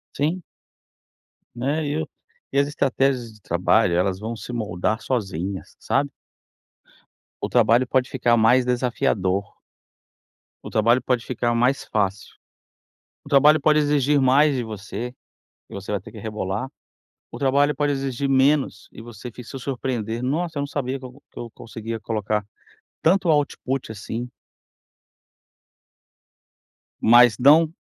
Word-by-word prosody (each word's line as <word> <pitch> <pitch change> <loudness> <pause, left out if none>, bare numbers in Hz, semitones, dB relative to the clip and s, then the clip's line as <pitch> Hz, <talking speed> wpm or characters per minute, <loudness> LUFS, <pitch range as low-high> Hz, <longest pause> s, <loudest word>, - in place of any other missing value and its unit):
Sim. 160 +6 -1 1.1
Né, 140 +6 -1
e 145 - -2
eu 155 0 -2 0.5
e - - +2
as 140 0 +3
estratégias 135 -4 0
de 105 - -19
trabalho 90 +2 +2
elas 90 +2 +1
vão 115 +2 -4
se 125 - -8
moldar 110 -1 -2
sozinhas, 95 -6 -3
sabe? 140 +1 0 1.3
O - - -1
trabalho 120 +3 +4
pode 130 0 +1
ficar 120 -2 +2
mais 120 +3 +4
desafiador. 100 -6 0 1.1
O - - -7
trabalho 115 +3 +3
pode 125 -1 -1
ficar 120 -1 -1
mais 125 +4 +1
fácil. 100 -1 -2 0.9
O - - -12
trabalho 150 +2 +5
pode 150 +1 +4
exigir 145 -1 +2
mais 135 +2 +4
de 125 - -2
você, 110 +3 -6 0.6
e - - -12
você 100 +1 -6
vai 100 - 0
ter - - -13
que - - -12
rebolar. 105 +2 -4 0.6
O - - -7
trabalho 140 +2 +2
pode 145 -1 0
exigir 135 0 -2
menos, 135 -5 +2
e - - -11
você 120 +1 -9
fi 125 - -10
se 135 +3 -8
surpreender, 125 -4 -3
"Nossa, 160 +4 -2
eu - - -1
não - - -2
sabia 135 -2 -3
que 130 - -8
e - - -10
que 140 +3 -16
eu 120 - -7
conseguia 115 0 -7
colocar 105 -1 -2 0.6
tanto 185 +2 +3
output 135 -5 0
assim". 115 +3 -6 2.7
Mas 120 0 +6
não 155 +5 +6
125 Hz, 140 wpm, -23 LUFS, 110-140 Hz, 2.7 s, Mas